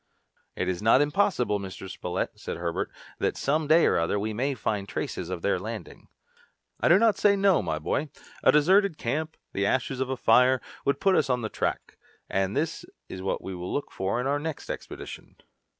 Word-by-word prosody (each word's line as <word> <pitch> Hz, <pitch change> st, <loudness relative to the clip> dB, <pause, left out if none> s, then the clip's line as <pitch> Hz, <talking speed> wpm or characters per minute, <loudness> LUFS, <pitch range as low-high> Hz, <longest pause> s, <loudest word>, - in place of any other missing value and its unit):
"It 90 Hz, -, -2 dB
is 95 Hz, 0 st, -2 dB
not 115 Hz, +4 st, +5 dB
impossible, 145 Hz, -, +1 dB
Mr. 95 Hz, 0 st, -7 dB
Spilett," 90 Hz, -1 st, -3 dB
said -, -, -6 dB
Herbert, 85 Hz, -1 st, -2 dB, 0.3 s
"that -, -, 0 dB
some 150 Hz, +2 st, 0 dB
day 160 Hz, +3 st, +6 dB
or -, -, +3 dB
other 85 Hz, +5 st, 0 dB
we 110 Hz, +2 st, -2 dB
may 135 Hz, +5 st, -1 dB
find 100 Hz, -3 st, -2 dB
traces 90 Hz, -, -4 dB
of 90 Hz, -2 st, -5 dB
their 100 Hz, -2 st, +1 dB
landing." 110 Hz, -2 st, -7 dB, 0.7 s
"I -, -, +2 dB
do 170 Hz, -, +7 dB
not 225 Hz, 0 st, +3 dB
say 205 Hz, -1 st, +5 dB
no, 195 Hz, -2 st, +4 dB
my 80 Hz, -3 st, -2 dB
boy. 135 Hz, -, -1 dB, 0.3 s
A -, -, +7 dB
deserted 180 Hz, +4 st, +4 dB
camp, 155 Hz, +7 st, -2 dB, 0.2 s
the 100 Hz, +1 st, +1 dB
ashes 130 Hz, +3 st, 0 dB
of 130 Hz, -1 st, -1 dB
a 130 Hz, -, -2 dB
fire, 125 Hz, +3 st, +5 dB, 0.3 s
would 140 Hz, -, +1 dB
put 195 Hz, -, +3 dB
us 150 Hz, -, +2 dB
on 125 Hz, -1 st, +1 dB
the 110 Hz, -, -2 dB
track, -, -, -3 dB, 0.3 s
and 95 Hz, +1 st, 0 dB
this 160 Hz, +1 st, -1 dB, 0.3 s
is 95 Hz, -, -6 dB
what 95 Hz, -, -2 dB
we 95 Hz, -, -5 dB
will 90 Hz, 0 st, -5 dB
look 145 Hz, -, -3 dB
for 95 Hz, +5 st, -1 dB
in 125 Hz, -, -2 dB
our 140 Hz, +2 st, +1 dB
next 155 Hz, -1 st, -5 dB
expedition." -, -, -8 dB
125 Hz, 200 wpm, -27 LUFS, 95-150 Hz, 0.7 s, do